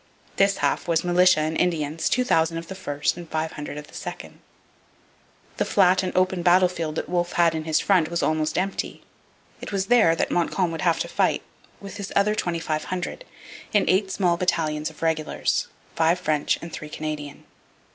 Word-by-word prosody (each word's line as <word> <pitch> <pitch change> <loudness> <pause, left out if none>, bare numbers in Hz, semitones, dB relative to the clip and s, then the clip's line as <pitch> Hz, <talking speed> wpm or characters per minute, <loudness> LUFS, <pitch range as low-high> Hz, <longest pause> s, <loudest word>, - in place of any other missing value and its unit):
This 195 0 +3
half - - 0
was 165 -2 +1
militia 180 -2 +4
and 155 +1 -1
Indians, 160 -3 0
2,000 165 -10 +2
of 165 0 -7
the - - -4
first 150 -5 -2
and 170 -2 -9
500 155 -2 -4
of 150 - -7
the - - -20
second. - - -8 1.2
The - - +2
flat 185 -1 +3
and 185 - -2
open 185 -1 +2
battlefield 175 -3 +2
that - - -3
Wolfe 175 0 -1
had 170 -2 +3
in 160 -1 -4
his 160 -1 +2
front 180 -6 +2
was 170 0 -1
almost 155 0 0
empty. 195 +2 -3 0.6
It - - -7
was 195 -2 -1
there 220 -8 +4
that - - -1
Montcalm 175 0 0
would 165 -2 -5
have 170 -2 +2
to - - -2
fight - - +1 0.4
with 200 0 -9
his 200 -2 -6
other 205 +1 +3
2,500, 175 - -3 0.5
in 205 - +4
eight 190 +1 +2
small 180 -3 +1
battalions 155 -4 0
of 160 - -12
regulars 160 -1 0 0.3
five 165 +2 +3
French 155 -4 0
and 170 - -8
three 155 - -7
Canadian. 150 -2 -6
170 Hz, 175 wpm, -24 LUFS, 155-185 Hz, 1.2 s, militia